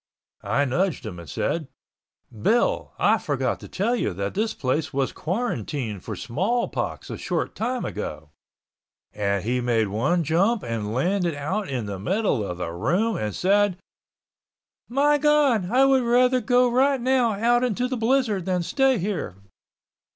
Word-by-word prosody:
I 145 - +1
nudged 155 +2 -1
him 90 -5 -6
and 85 -4 -11
said, 160 - -2 0.7
"Bill, 220 - +1
I - - +3
forgot - - -1
to - - -10
tell 225 +6 0
you 160 - -2
that 100 +2 -3
this 215 +2 -1
place 140 +3 -1
was 135 -1 -1
quarantined 145 - -3
for - - -5
Smallpox 200 - -2
a - - -6
short - - -2
time 245 +2 -2
ago," 75 -1 -6 0.8
and 100 -2 -1
he 125 +3 0
made 115 -3 +1
one 150 - +1
jump 190 - +1
and 110 -3 -3
landed 175 - 0
out 185 +9 -3
in 125 -5 -2
the 100 -2 -5
middle 185 - 0
of 90 -3 -5
the 90 -2 -4
room 180 - 0
and 105 -1 -3
said, 200 0 +2 1.1
"My 290 +4 +3
God, 285 -10 +3
I 260 +4 +4
would 270 -1 +4
rather 250 +1 +3
go 245 +2 +3
right 265 +3 +2
out 240 -2 +3
into 245 0 0
the 255 - -2
blizzard 225 -5 +1
than 180 -2 0
stay 270 +7 +2
here!" 195 - -3
190 Hz, 155 wpm, -24 LUFS, -, 1.1 s, I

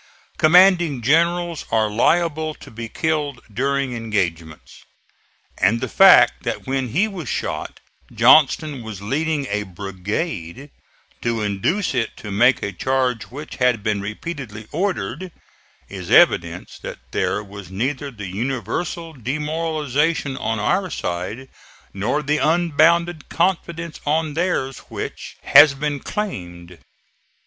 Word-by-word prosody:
Commanding 170 -5 +5
generals 170 +4 +1
are 110 -1 +2
liable 155 +7 +1
to - - -14
be 115 0 -7
killed 150 -2 -1
during 135 +1 -1
engagements; 90 -9 -4 0.8
and 105 +6 +3
the - - -3
fact - - +6
that - - -4
when 135 -1 -1
he 175 - +1
was 180 - -7
shot - - -4 0.3
Johnston 140 +3 +4
was 110 -4 -8
leading 150 +5 -1
a 105 -3 -2
brigade 100 - -5 0.5
to 115 -2 -1
induce 105 - -1
it 115 - -2
to 105 - -8
make 120 +5 +3
a 100 - -2
charge 125 +4 -1
which 145 +4 -9
had 125 -5 +2
been 105 -2 0
repeatedly 110 0 -6
ordered, 185 +1 -2 0.6
is - - -8
evidence 85 +1 +3
that - - -7
there 105 - -1
was 100 -2 -11
neither 130 +8 -2
the 105 -6 -9
universal 135 - -3
demoralization 150 +1 -1
on 115 -3 -2
our 185 - 0
side 100 - -4 0.5
nor 115 +10 -1
the 150 +1 0
unbounded 170 0 +2
confidence 170 -2 -1
on 155 0 +1
theirs 150 -6 -1
which - - -7
has 145 0 +7
been 145 0 -2
claimed. 90 - -6
135 Hz, 120 wpm, -21 LUFS, 105-160 Hz, 0.8 s, has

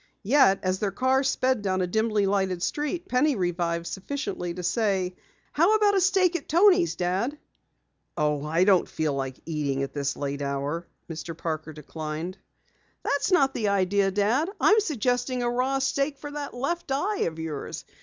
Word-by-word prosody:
Yet 210 -4 +4
as 185 0 0
their 205 - 0
car 260 +7 +2
sped 260 -3 +1
down 190 -2 0
a - - +2
dimly 215 +2 +1
lighted 190 -3 0
street, 315 +5 -2
Penny 265 +3 +2
revived 170 -3 -1
sufficiently 195 - -4
to 180 +1 -6
say: 190 -2 0 0.4
"How 345 +8 +4
about 420 -1 +4
a 390 - +3
steak 370 -2 +3
at - - -4
Toni's, 360 +1 +4
Dad?" 190 +11 -1 0.8
"Oh, 150 -1 0
I 160 +4 +2
don't 190 -2 +4
feel 155 -2 -1
like 135 -1 -3
eating 145 -4 -1
at 135 - -5
this 140 -1 -2
late 140 0 -3
hour," 140 +4 -3 0.2
Mr. 165 0 -6
Parker 160 -1 -4
declined. 155 +4 -6 0.6
"That's 285 +7 0
not 275 -7 +4
the 215 - -1
idea, 200 0 +2
Dad. 215 - +1
I'm 435 - +5
suggesting 250 - -1
a 240 - +1
raw 255 +3 +1
steak 275 +1 0
for 290 +1 -8
that 290 -2 -6
left 335 +5 -3
eye 390 +10 0
of 160 -1 -5
yours. 160 -3 -5
200 Hz, 170 wpm, -26 LUFS, 170-280 Hz, 0.8 s, I'm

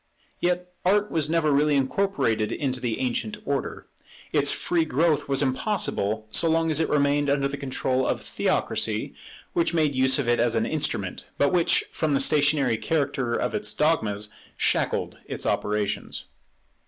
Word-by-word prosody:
Yet 180 0 -1
Art 205 +3 +2
was 155 -2 +1
never 160 -2 +2
really 145 +1 +3
incorporated 135 - 0
into 130 -3 -2
the 120 -3 -2
ancient 120 -4 -2
order. 140 -2 -3 0.5
Its - - +3
free 170 -2 0
growth 160 +1 +1
was 135 +1 +2
impossible 130 - -1
so 165 - +4
long 165 0 +2
as 155 - +2
it 160 - 0
remained 145 0 +2
under 140 -1 +2
the 140 - -5
control 130 -1 -1
of - - -1
Theocracy, - - -1 0.4
which 170 0 +1
made 155 -3 +2
use 130 0 +3
of 140 -4 -1
it 120 0 +2
as 120 0 +3
an - - +1
instrument, - - -2
but 145 +4 +2
which, 175 -2 +3
from 155 -3 0
the - - +2
stationary 140 -4 +2
character 140 -6 -1
of - - -1
its 210 - -1
dogmas, 110 -10 0 0.3
shackled - - 0
its - - -6
operations. 105 -1 -1
140 Hz, 160 wpm, -25 LUFS, 130-160 Hz, 0.5 s, so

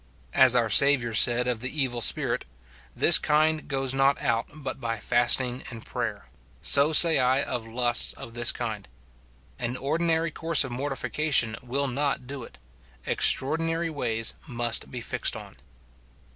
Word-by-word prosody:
As 130 -2 +5
our 120 -2 +1
Saviour 125 +1 +3
said 120 +3 +4
of 125 -2 -2
the 130 - -2
evil 130 -5 -3
spirit, - - +1 0.3
" - - -23 0.2
This - - +7
kind 155 +1 0
goes 135 -2 -2
not 135 +1 +1
out 115 -5 -2
but 145 -2 -8
by 115 -1 -4
fasting 120 +3 +1
and 115 -3 -11
prayer," - - -6 0.3
so 140 +3 +4
say 160 0 +6
I 130 +2 +1
of 120 -3 -5
lusts 120 +1 +2
of 115 - -12
this 120 +1 +1
kind. 110 -4 -6 0.7
An 120 0 -4
ordi 155 +6 -3
nary 165 0 -1
course 165 -2 +2
of 135 - -8
mortification 135 -2 -2
will 135 +3 -3
not 135 0 -3
do 135 0 -8
it; 65 - -15 0.5
extraordinary 165 +3 0
ways 115 -6 -1
must 120 -3 0
be 125 - -8
fixed - - -3
on. - - -12
130 Hz, 160 wpm, -24 LUFS, 120-145 Hz, 0.7 s, This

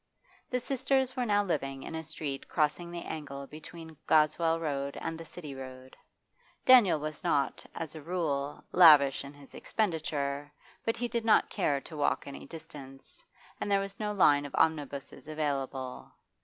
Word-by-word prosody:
The 250 - 0
sisters 265 0 0
were 250 -2 -1
now 205 -1 +3
living 135 -7 -2
in - - -7
a 160 0 -4
street 150 -3 -5
crossing 155 +2 0
the 170 0 -6
angle 140 -3 -6
between 160 +2 -10
Goswell 160 +1 +3
Road 140 -3 -2
and 165 - -3
the 165 0 -8
City 155 -3 -8
Road. 130 -1 -9 0.7
Daniel 240 -11 +7
was 155 0 -5
not, 140 -2 +1
as 160 -2 -5
a 155 - -8
rule, 145 -4 -2
lavish 150 -7 +7
in 140 +1 -10
his 145 -1 -16
expenditure, 145 -7 -2 0.3
but 225 - 0
he 240 - -1
did 235 -1 -2
not 225 -1 +4
care 145 -8 +1
to 160 - -10
walk 145 - +1
any 140 - -8
distance, 150 -5 -11 0.4
and - - -2
there 200 -1 +4
was 195 0 -5
no 210 -1 -1
line 145 -8 +5
of - - -8
omnibuses 145 -3 -1
available. 135 -4 -3
155 Hz, 165 wpm, -30 LUFS, 140-175 Hz, 0.7 s, Daniel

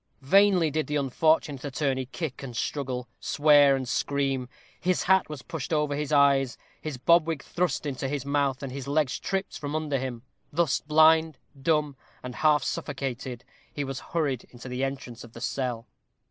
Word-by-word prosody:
Vainly 185 0 +4
did 155 +1 -1
the 150 - -2
unfortunate 145 0 +1
attorney 135 -2 -1
kick 145 0 -5
and 125 -4 -7
struggle, 130 -3 -3
swear 145 -2 +5
and 130 -1 -3
scream; 135 -1 -1 0.3
his 180 0 +1
hat 190 -1 +3
was 150 -5 -7
pushed 160 -1 -6
over 150 -2 +1
his 150 0 -3
eyes; 140 -3 +4 0.2
his 155 -4 -5
bob 170 +5 +4
wig 160 -4 -3
thrust 175 -4 -1
into 135 -2 -3
his 140 -1 -3
mouth; 140 -2 0
and 135 - -4
his 135 +1 -6
legs 145 -2 +1
tripped 195 +1 -3
from 145 +1 -4
under 150 -3 -1
him. 125 -3 -5 0.3
Thus 165 -2 +1
blind, 160 0 +4 0.2
dumb, 150 -1 +1 0.3
and 125 0 -6
half 150 -3 +3
suffocated, 125 -2 -4 0.3
he 145 - -3
was 135 -1 -4
hurried 145 -7 -2
into 125 +1 -11
the 125 +1 -3
entrance 130 -3 -5
of 120 -1 -13
the 115 - -9
cell. 125 -2 -2
140 Hz, 175 wpm, -27 LUFS, 130-155 Hz, 0.3 s, swear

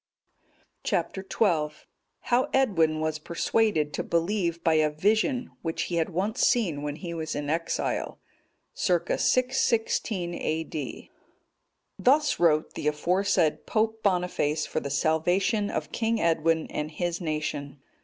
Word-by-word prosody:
Chap. - - -1
XII. 190 -5 +1 0.5
How 250 +1 +1
Edwin 165 -12 +2
was 155 -1 -1
persuaded 170 -1 0
to - - -1
believe 170 -1 0
by 165 - +3
a 155 -1 +3
vision 220 - +1
which 165 -1 -2
he 175 - -2
had 165 - +1
once 195 +7 -1
seen 175 -12 +2
when 145 0 -3
he 170 +1 -6
was 160 -1 -4
in 145 0 -2
exile. 165 +1 -2 0.5
[Circ. 175 -3 0
616 225 -7 +1
A.D.] 155 -4 -4 0.9
Thus 290 +4 +3
wrote 160 -3 +3
the - - -3
aforesaid 170 +2 +1
Pope 220 0 0
Boniface 180 -6 0
for - - -2
the 140 - -5
salvation 175 - +1
of 155 0 -3
King 225 0 0
Edwin 165 -1 +2
and 150 0 -3
his 170 +3 -3
nation. 150 -3 -3
170 Hz, 130 wpm, -27 LUFS, 155-205 Hz, 0.9 s, by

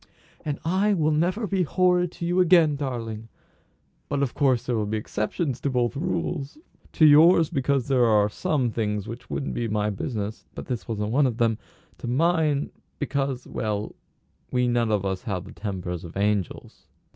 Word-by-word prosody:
"And 145 -2 -2
I 195 +5 +2
will 155 -3 +2
never 180 +8 +1
be 195 -2 0
horrid 180 +1 +2
to 170 - -5
you 175 +2 +1
again, 170 -4 +5
darling! 115 -5 -5 0.8
But 145 -1 0
of 130 - -2
course 130 -5 +2
there 125 - 0
will 105 -2 -1
be 110 +1 -1
exceptions 120 - -3
to 140 - 0
both 125 -1 0
rules; 155 - -3 0.4
to 155 - +5
yours 160 +2 +6
because 135 -1 0
there 130 -3 +3
are 105 -2 +4
some 125 +3 -1
things 105 -2 -2
which 120 +1 -8
wouldn't 135 - -3
be 120 - -2
my 105 -1 0
business 105 0 -4
(but - - -7
this 125 -3 -4
wasn't 105 -2 -2
one 140 +3 +3
of 120 -3 -3
them); 115 -2 +1 0.4
to - - -6
mine, 155 +2 +1 0.3
because 135 -3 -2
well 105 -1 -3 0.6
we 125 0 +2
none 120 -2 +1
of 100 -2 0
us 95 -1 -2
have 95 -6 -3
the 95 - -11
tempers 90 -4 -5
of 85 +1 -9
angels." 100 -2 -2
125 Hz, 180 wpm, -25 LUFS, 110-150 Hz, 0.8 s, yours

